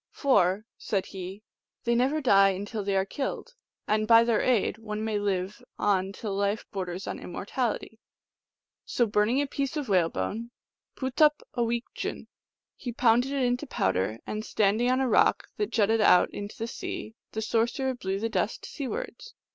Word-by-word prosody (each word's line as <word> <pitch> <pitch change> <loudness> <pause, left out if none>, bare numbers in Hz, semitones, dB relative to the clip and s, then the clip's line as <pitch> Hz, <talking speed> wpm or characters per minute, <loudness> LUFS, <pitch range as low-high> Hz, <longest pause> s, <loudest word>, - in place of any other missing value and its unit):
" - - -65
For," 210 -6 +3
said 195 -3 -1
he, 190 +2 -8 0.2
" - - -61
they 235 - +2
never 265 +6 +2
die 195 -6 +5
till 210 0 -4
they 200 0 0
are 190 0 +2
killed, 280 - -4 0.3
and 215 0 +1
by 230 0 +8
their 230 -2 +2
aid 225 -3 +1
one 215 -1 -4
may 215 -2 0
live 195 -1 -2
on 195 -2 +1
till 200 0 -5
life 200 +2 0
borders 185 -2 -4
on - - -4
immortality." 225 +4 -3 0.8
So 240 - +1
burning 215 +6 +2
a - - -1
piece 280 +2 -3
of 285 -6 -3
whale 180 -4 +4
bone 215 - -3 0.5
(pootup 295 +3 +2
awicjun), 235 0 -2 0.5
he 245 - -5
pounded 245 +2 +3
it 250 -3 +1
to 295 - -7
powder, 95 - 0
and, 215 0 -4
standing 215 +3 +2
on 255 +1 +2
a 265 - +2
rock 235 - +3
that 420 - -1
jutted 220 0 +2
out 180 -3 +5
into 205 0 -7
the 225 - -3
sea, 225 -1 -6 0.2
the 220 - -2
sorcerer 240 +4 0
blew 195 -5 -3
the 225 - 0
dust 225 - -2
seawards. 310 - -6
220 Hz, 170 wpm, -28 LUFS, 200-250 Hz, 0.8 s, by